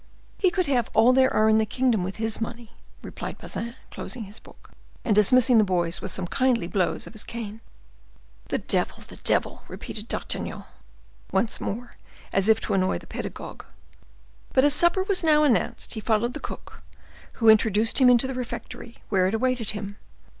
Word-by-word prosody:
"He 380 - +4
could 365 0 0
have 250 -6 0
all 235 +3 +6
there 260 0 +4
are 215 - +3
in 220 0 +4
the - - +3
kingdom 240 -4 +1
with 190 +2 -4
his 220 0 -3
money," 230 0 -6 0.3
replied - - -7
Bazin, 235 +1 -6 0.2
closing 245 -3 -6
his 205 +2 -11
book, - - -19 0.3
and 215 - +2
dismissing 245 +3 +5
the - - +5
boys 175 -3 0
with 190 - -4
some 185 0 -2
kindly 250 0 +1
blows 180 0 -1
of - - -11
his 215 - -6
cane. 225 -1 -7 0.9
"The - - -1
devil! - - -1
the - - -12
devil!" - - 0
repeated 215 +1 -7
D'Artagnan, - - -3 0.7
once 230 - 0
more, 240 +4 -5 0.4
as 195 +2 +3
if 220 0 +5
to - - -2
annoy 185 -1 +1
the - - -12
pedagogue. - - -7 0.9
But 265 +1 +4
as 290 - +4
supper 345 +5 +3
was 385 -2 +1
now 305 -2 +5
announced, 265 -7 0
he 220 - -4
followed 225 +3 0
the - - -6
cook, - - -9 0.5
who 225 - 0
introduced 220 +2 +4
him 255 - +7
into 245 +1 +5
the 265 - -3
refectory, 245 -1 -7
where 185 -3 +3
it 200 - -1
awaited 250 -2 0
him. 205 -1 -5
225 Hz, 180 wpm, -25 LUFS, 210-255 Hz, 0.9 s, him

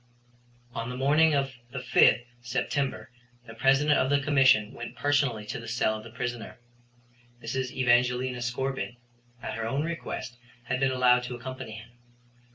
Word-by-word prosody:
On 115 +1 -4
the 125 - -5
morning 150 +4 +4
of 135 -1 0 0.2
the 135 - -7
5th 125 -1 +4 0.2
September 130 +2 -2 0.3
the 115 - -10
President 135 +5 +3
of 130 - +1
the 145 0 +3
Commission 135 -7 +4
went 120 - -8
personally 140 -7 +1
to - - -5
the 115 - -9
cell 115 -1 +1
of 110 - -8
the 115 - -10
prisoner. 120 0 -5 0.8
Mrs. 130 +3 -3
Evangelina 125 0 +2
Scorbitt, 125 +1 -3 0.5
at - - -4
her 115 -1 -3
own 135 +5 -1
request, 165 -7 -5 0.3
had 130 +1 -2
been 135 0 +3
allowed 125 -1 +4
to 125 0 -5
accompany 130 -2 -7
him. 110 +2 -11
125 Hz, 160 wpm, -28 LUFS, 120-135 Hz, 0.8 s, morning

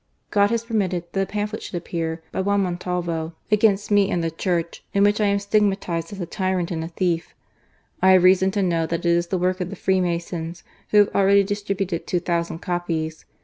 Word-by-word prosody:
"God 205 0 +4
has 230 0 0
permitted 190 -7 -1
that 195 - 0
a - - +1
pamphlet 210 +1 -3
should - - -7
appear 165 -1 -3
by - - -1
Juan 200 +1 +2
Montalvo 175 -3 -2 0.2
against 210 -1 +3
me 205 -1 +4
and 175 -4 0
the 165 - -1
Church, 170 0 -2
in 200 - +4
which 205 +1 +3
I 210 - +3
am 200 0 +2
stigmatized 200 -5 0
as 200 - -8
a 175 - -2
tyrant 185 0 -1
and 160 -2 -2
a - - -4
thief. 170 0 -2 0.7
I 190 0 +6
have 185 -1 +5
reason 190 +1 +5
to 200 - +1
know 165 -3 +1
that 165 0 -2
it 170 - +4
is 170 0 +2
the 185 - -1
work 185 +1 0
of 180 - -2
the 200 - -6
Free 190 -1 +1
masons, 170 -1 -3 0.3
who 210 -1 +7
ha\e - - -8
already 200 0 +5
distributed 195 -3 -3
two 180 - +1
thousand 170 -1 -2
copies. 165 -3 -3
185 Hz, 215 wpm, -23 LUFS, 170-200 Hz, 0.7 s, who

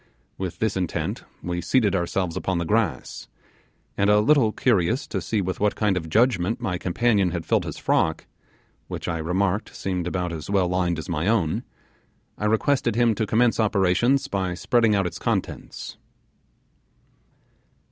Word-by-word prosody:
With 95 -2 -5
this 110 -2 0
intent 90 -3 -2 0.2
we 85 0 -2
seated 110 -1 +2
ourselves 85 -1 -1
upon 95 -2 -1
the 85 - -1
grass; 110 +4 -1 0.7
and 100 - +2
a 105 0 +5
little 130 -1 +4
curious 120 +4 +1
to - - -3
see 110 -3 -1
with 95 0 -3
what 105 0 +1
kind 105 -3 +1
of 80 -3 -3
judgement 110 0 +2
my 95 -7 -2
companion 100 +1 +2
had 85 -1 -4
filled - - +1
his - - -6
frock 80 - 0 0.6
which - - -6
I 85 -2 -2
remarked 95 +5 -1
seemed 90 -2 -2
about 90 -1 -2
as 80 +1 -7
well 95 -3 +2
lined 90 -1 0
as 80 - -6
my 85 0 -1
own 100 -8 +1 0.7
I 105 - -4
requested 110 +3 +1
him 120 -1 +3
to 110 +1 -2
commence 115 +3 +2
operations 110 +5 +2
by 95 -2 -2
spreading 115 +3 +2
out 100 -2 +1
its 90 - -4
contents. - - -3
95 Hz, 160 wpm, -24 LUFS, 90-110 Hz, 0.7 s, a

